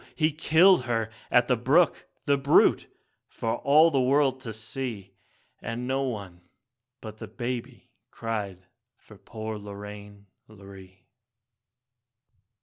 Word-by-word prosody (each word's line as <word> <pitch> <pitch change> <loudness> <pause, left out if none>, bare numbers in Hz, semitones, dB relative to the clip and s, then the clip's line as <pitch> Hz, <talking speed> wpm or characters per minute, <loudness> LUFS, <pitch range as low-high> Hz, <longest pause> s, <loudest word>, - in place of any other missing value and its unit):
he 155 -1 +2
killed 160 +1 +4
her 115 -2 -1 0.2
at - - +3
the - - +3
brook, - - +2 0.2
the 140 - +3
brute, 140 +1 +3 0.4
for 115 +1 -3
all 155 +4 +5
the 135 -3 +2
world 135 0 +2
to 125 -4 -7
see, 110 -1 -6 0.5
And 115 +2 -5
no 135 +1 0
one 100 -9 -5 0.6
but 110 -1 -10
the - - -7
baby 120 -1 -6 0.2
cried 100 -5 -5 0.3
for - - -18
poor 110 -1 -7
Lorraine, 100 0 -10 0.2
Lorree. 95 -2 -15
115 Hz, 120 wpm, -26 LUFS, 105-135 Hz, 0.6 s, all